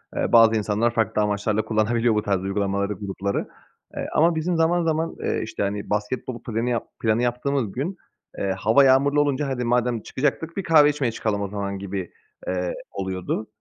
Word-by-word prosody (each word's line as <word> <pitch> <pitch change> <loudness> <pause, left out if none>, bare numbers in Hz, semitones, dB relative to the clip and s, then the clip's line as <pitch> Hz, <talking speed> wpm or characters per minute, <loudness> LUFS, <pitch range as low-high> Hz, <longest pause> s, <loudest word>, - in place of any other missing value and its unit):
eee, - - -1
bazı 115 -1 +7
insanlar 110 +2 +1
farklı 110 -1 +1
amaçlarla 105 +1 0
kullanabiliyor 110 +1 +1
bu 105 - +2
tarz 100 -3 0
uygulamaları 100 +1 -1
grupları. 100 0 -3 0.5
Eee, - - -3
ama 165 +2 +4
bizim 165 +3 0
zaman 170 +2 +2
zaman, 160 0 -1
eee, - - 0
işte, 110 -1 -4
hani, 100 +1 -3
basketbol 110 +3 -3
planı 115 +1 -2
yap 120 -2 -1
planı 110 +1 +2
yaptığımız 125 -1 -1
gün, 160 - -3 0.4
eee, 100 - -1
hava 110 +8 +5
yağmurlu 140 +2 +4
olunca 145 0 0
hadi 130 -2 -2
madem 120 -1 +1
çıkacaktık 160 - -2
bir 195 - -1
kahve 155 -3 +6
içmeye 145 -5 -1
çıkalım 110 -2 -2
o 100 - -1
zaman 100 -1 -4
gibi, 95 -2 -5 0.4
eee, 90 -1 -1 0.2
oluyordu. 95 +2 -3
115 Hz, 175 wpm, -24 LUFS, 100-135 Hz, 0.5 s, bazı